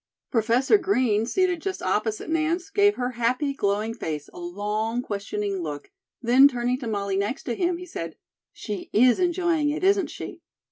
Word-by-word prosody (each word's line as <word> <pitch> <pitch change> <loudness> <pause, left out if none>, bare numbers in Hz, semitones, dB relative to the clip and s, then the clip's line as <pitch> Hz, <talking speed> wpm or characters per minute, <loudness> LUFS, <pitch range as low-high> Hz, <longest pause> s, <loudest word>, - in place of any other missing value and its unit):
Professor 245 - +3
Green, 250 - +1
seated 360 +3 +1
just 385 +1 -3
opposite 215 +3 -1
Nance, 325 +4 -1
gave 410 0 +4
her 250 0 -2
happy, 250 +4 0
glowing 210 -1 0
face 155 -9 -5
a - - -10
long 210 +6 -2
questioning 200 -2 -3
look, 150 - -6 0.3
then 255 +4 +7
turning 250 -1 -1
to 250 - -5
Molly 200 -3 -1
next 205 +6 -2
to 240 - -2
him, 350 +3 0
he 360 - -8
said: 165 - -6 0.4
"She 205 -3 -6
is 245 - +5
enjoying 345 -4 +1
it, 300 +4 -3
isn't 390 0 +3
she?" - - -8
245 Hz, 170 wpm, -25 LUFS, 210-330 Hz, 0.4 s, then